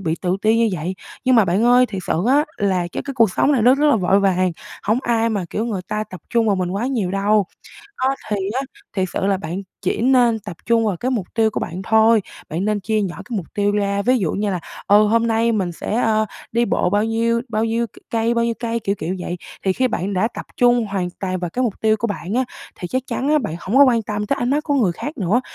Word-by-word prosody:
bị 160 -4 -1
tự 180 +1 +1
ti 220 +1 +4
như 230 -1 +3
vậy. 175 +2 -3 0.3
Nhưng 255 0 +4
mà 225 - +6
bạn 190 +5 +1
ơi, 245 +1 +5
thiệt 195 -4 -6
sự 170 +5 0
á 290 +3 +4
là 195 -3 +1
cái - - -3
cái 275 - -6
cuộc 230 -6 +4
sống 285 - +2
này 245 -6 +2
nó 250 +3 +6
rất 295 +2 +2
là 280 - +4
vội 195 0 +3
vàng, 185 -2 +2 0.3
hông 215 +4 +1
ai 230 -2 +1
mà, 200 -4 -1
kiểu, 220 - -2
người 200 -5 -3
ta 215 0 -2
tập 185 -4 -11
trung 230 -1 +2
vào 200 -3 +2
mình 180 -1 -1
quá 200 +6 -2
nhiều 225 -9 -1
đâu. 200 0 +2 0.6
Đó 265 +1 +2
thì 210 - 0 0.2
á, - - 0 0.3
thiệt 190 -2 0
sự - - -1
là 195 -1 +2
bạn 175 +2 -5 0.2
chỉ - - -1
nên 245 -2 +4
tập 200 -5 -8
trung 230 -1 +3
vào 195 -5 0
cái 255 +7 -2
mục 210 -8 -2
tiêu 220 -1 +3
của - - -2
bạn 180 +2 -5
thôi, 220 +1 +4 0.3
bạn 170 +5 -2
nên 210 -1 0
chia 215 +2 0
nhỏ 190 -4 -3
cái 240 -4 -3
mục 180 - -4
tiêu 205 0 +1
ra, 200 -1 0
ví 250 +4 +3
dụ 180 -8 0
như 205 0 -1
là, 180 - -2 0.3
ờ, 205 +1 +6
"Hôm 230 +2 +2
nay 230 +1 +2
mình 190 -5 -1
sẽ, 175 - -4
ơ, 215 -1 +2 0.3
đi 235 +1 +2
bộ 180 - +1
bao 205 +3 +2
nhiêu? 230 +1 +1
Bao 215 +1 0
nhiêu 230 +1 0
c - - -37 0.2
cây? 230 0 +1
Bao 235 0 +1
nhiêu 235 - 0
cây?" 235 -1 -2
Kiểu, 200 -2 -1
kiểu, 180 +3 -2
vậy 180 0 -4 0.3
thì 190 - +3
khi 255 +4 +1
bạn 200 -3 -2
đã 190 +4 +2
tập - - -7
trung 240 -2 +4
hoàn 190 -3 -2
toàn 185 -1 -2
vào 175 -1 -3
cái 255 +8 -1
mục 225 -5 -2
tiêu 220 0 +3
của 235 - -1
bạn 200 -2 -4
á 255 +2 +2 0.3
thì 175 - -6
chắc 260 +6 -1
chắn 275 +3 -2
á 305 - +4
bạn 205 - -4
hổng 215 +8 0
có 285 - +9
quan 245 -4 +3
tâm 210 0 -3
tới 275 - 0
ánh 245 +1 0
mắt 295 +2 +1
của 290 - -1
người 220 -10 +3
khác 290 - -6
nữa. 210 +6 +1
215 Hz, 275 wpm, -20 LUFS, 195-235 Hz, 0.6 s, có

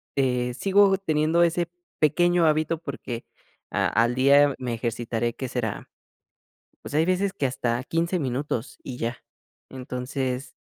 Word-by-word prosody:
eh, 125 -2 +1
sigo 195 +4 +4
teniendo 160 -1 +2
ese 170 0 +1 0.3
pequeño 175 +3 +3
hábito 155 +1 +2
porque 135 -6 -6 0.5
a - - +1
al 120 +2 +2
día 140 +2 +5
me 125 -2 -3
ejercitaré, 115 0 -2
¿qué 130 - -5
será? 115 -5 -3 0.9
Pues, - - -9
hay 155 +2 +3
veces 185 +2 +1
que 145 -9 -2
hasta 125 -1 -1
15 170 +4 0
minutos 130 -2 -3
y 130 -2 -6
ya. 120 +1 -3 0.5
Entonces. 130 0 -4
135 Hz, 135 wpm, -25 LUFS, 125-165 Hz, 0.9 s, día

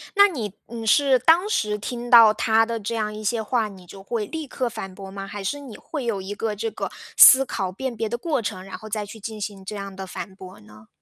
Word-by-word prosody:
那 405 0 +8
你 225 - -5
你 230 -1 -7
是 265 +3 +4
当 330 - +4
时 210 - 0
听 240 +3 -6
到 230 -3 +9
他 225 +1 +3
的 230 0 -3
这 220 +2 -4
样 215 -1 -2
一 215 - -7
些 225 +2 0
话， 230 -1 0
你 190 -3 -13
就 195 +2 -12
会 215 +2 -3
立 315 +5 -6
刻 250 -1 -2
反 190 -4 -7
驳 195 0 -9
吗？ 195 0 -7
还 205 0 -7
是 285 +9 -2
你 260 -6 -10
会 285 -6 -6
有 215 -5 -1
一 190 +2 -5
个 215 +1 -3
这 225 +2 -3
个 - - -4 0.3
思 270 +1 +9
考 195 -7 -3
辨 255 +5 -4
别 225 0 -1
的 240 +2 -3
过 290 0 -1
程， 185 -3 -5
然 195 - -8
后 215 - -11
再 210 0 -2
去 205 +2 -11
进 220 +1 -7
行 195 -2 -6
这 210 - -6
样 200 -1 -6
的 190 0 -7
反 190 - -7
驳 185 -1 -12
呢？ 105 +1 -17
215 Hz, 280 characters per minute, -23 LUFS, 195-240 Hz, 0.3 s, 到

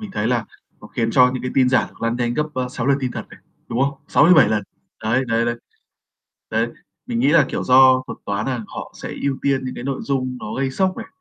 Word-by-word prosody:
mình 215 -2 -7
thấy 110 - -2
là 120 -2 +1 0.4
nó - - -11
khiến 115 0 -2
cho 125 +1 +5
những 125 - -4
cái 125 - -3
tin 130 -1 +4
giả 130 - +3
được - - -17
lan 115 +1 0
nhanh 120 -1 -1
gấp, 150 - +1
a, 125 -1 -2
6 125 -1 -4
lần 140 0 +3
tin 130 -2 -2
thật - - -5
này, - - -14 0.3
đúng 120 - -2
không? 140 +1 0
6-7 155 -6 +6
lần. 110 -1 0 0.4
Đấy, 115 +4 +1
đấy, 115 +1 +2
đấy, 120 0 0 1.0
đấy, - - +1 0.4
mình 235 -2 -2
nghĩ - - +3
là, 150 -3 +5
kiểu, - - -3
do 130 0 +6
thuật - - -7
toán 100 +1 -2
nà 125 -4 -2
họ - - -8
sẽ - - -4
ưu 135 -1 0
tiên 135 -2 0
những 130 - -5
cái - - -7
nội 135 0 -3
dung 130 -2 -2
nó 105 - -6
gây 135 0 -1
sốc 185 +5 0
này, 225 - -7
130 Hz, 255 wpm, -21 LUFS, 120-140 Hz, 1.0 s, 6-7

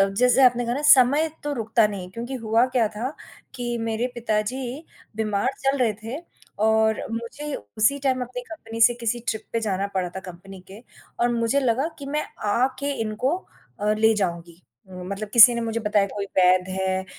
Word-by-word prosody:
अ, 195 - +7
जैसे 250 +6 +3
आपने 245 -1 +4
कहा 240 +1 -1
ना 285 - -3
समय 280 +5 +3
तो 295 - -3
रुकता 225 -1 +2
नहीं 200 -3 -6
है, - - -10
क्योंकि 235 +6 -6
हुआ 230 -1 +2
क्या 250 -4 +1
था 230 +6 -4 0.4
कि 240 -1 -3
मेरे 225 +1 -1
पिताजी 240 +5 -3 0.3
बीमार 215 0 0
चल 270 +1 0
रहे 235 -4 +2
थे 235 +7 -5 0.4
और 220 0 +2
मुझे 235 +6 -5 0.2
उसी 280 +7 +3
टाइम 260 -1 +1
अपनी 250 0 -5
कंपनी 230 -7 -9
से 240 - +6
किसी 235 +1 -1
ट्रिप 220 - -1
पे 230 - 0
जाना 200 -2 -1
पड़ा 185 -2 0
था - - -4
कंपनी 185 +1 -11
के 200 - -10 0.4
और 240 - +3
मुझे 235 +4 +1
लगा 260 +3 +1
कि 280 - -8
मैं 300 +2 -2 0.3
आके 260 +5 0
इनको 225 +9 -1 0.4
अ, 210 +1 +2
ले 220 +1 +3
जाऊँगी, 170 -3 -4 0.3
मतलब 190 +3 -6
किसी 235 +1 +9
ने 235 - -2
मुझे 230 0 -2
बताया 210 -2 +2
कोई 200 0 -5
वैध 185 0 +4
है, 190 0 -1
225 Hz, 190 wpm, -24 LUFS, 205-250 Hz, 0.4 s, किसी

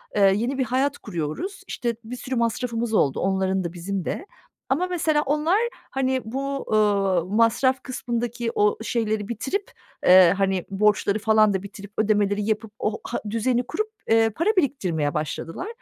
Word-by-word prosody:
Eee, 195 -2 +5
yeni 240 +6 -1
bir 260 - +1
hayat 270 +4 0
kuruyoruz. 170 - -5
İşte, 235 -1 -2
bir 245 +3 -7
sürü 260 +1 -4
masrafımız 235 -1 -1
oldu. 140 -10 +2
Onların 190 0 0
da 170 -1 -4
bizim 185 +1 -4
de. - - -3 0.4
Ama 325 +8 +1
mesela 315 -4 +1
onlar, 300 +6 +2 0.3
hani, 260 -1 0
bu, 275 +4 -3
ııı, 200 -5 +2
masraf 230 +6 +2
kısmındaki 240 -2 -3
o 210 0 +3
şeyleri 220 -3 -1
bitirip, 280 - -3 0.3
eee, 180 -1 +8
hani, 195 -2 0
borçları 205 +1 +2
falan 215 -1 +4
da 190 0 -2
bitirip, 200 0 -10
ödemeleri 205 -1 +2
yapıp 220 0 -2
o 215 0 -2
ha - - -3
düzeni 235 +3 +1
kurup, 430 +6 -2 0.2
eee, 225 0 +5
para 335 - -1
biriktirmeye 180 - 0
başladılar. 165 - -4
220 Hz, 155 wpm, -24 LUFS, 195-260 Hz, 0.4 s, eee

